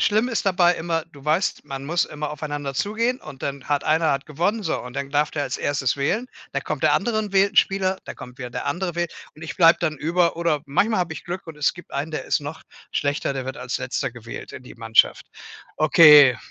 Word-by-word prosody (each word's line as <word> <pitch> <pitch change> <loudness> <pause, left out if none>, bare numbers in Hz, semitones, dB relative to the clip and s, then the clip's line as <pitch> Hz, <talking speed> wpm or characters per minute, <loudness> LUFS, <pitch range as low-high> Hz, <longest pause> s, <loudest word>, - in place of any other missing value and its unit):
Schlimm 215 +4 +2
ist 230 - -2
dabei 180 -2 +4
immer: 165 -1 -2
Du 140 - -14
weißt, 160 +6 0
man 135 0 -6
muss 170 +4 +1
immer 150 0 -5
aufeinander 145 -2 -4
zugehen 230 - -1
und 140 -3 -11
dann 140 -1 -4
hat 145 -1 -1
einer 160 +1 +2
hat 135 +1 -2
gewonnen, 180 +9 -1
so. - - -1
Und 125 0 -9
dann 140 0 -3
darf 145 +1 +1
der 145 - -2
als 135 0 -3
1. 140 -2 0
wählen. 175 - 0 0.3
Da - - -1
kommt - - -4
der - - +4
andere 230 -2 0
und 210 -2 -3
wählt 195 +1 +3
'n - - -16
Spieler, 190 -1 +2
da - - -7
kommt 125 +2 -11
wieder 125 -2 -6
der - - -5
andere 180 -1 -2
wähl 175 0 -1 0.3
und 155 - -13
ich 160 - -6
bleibe 170 -3 +6
dann 155 -3 -1
über. 170 +3 +1
Oder 165 -4 0
manchmal 200 +9 +1
habe 175 -2 -2
ich 155 - -9
Glück 175 +2 -6
und 160 -2 -9
es 150 - +1
gibt 175 - -14
einen, 145 +3 -3
der 155 - -4
ist - - +1
noch 145 +2 -7 0.3
schlechter, 145 0 -1
der 135 -1 -4
wird 130 0 -5
als - - -3
Letzter - - -2
gewählt - - -9
in - - -9
die 125 - -12
Mannschaft. 115 -1 +2 0.5
Okay, 150 -4 +8
155 Hz, 240 wpm, -23 LUFS, 140-180 Hz, 0.5 s, Okay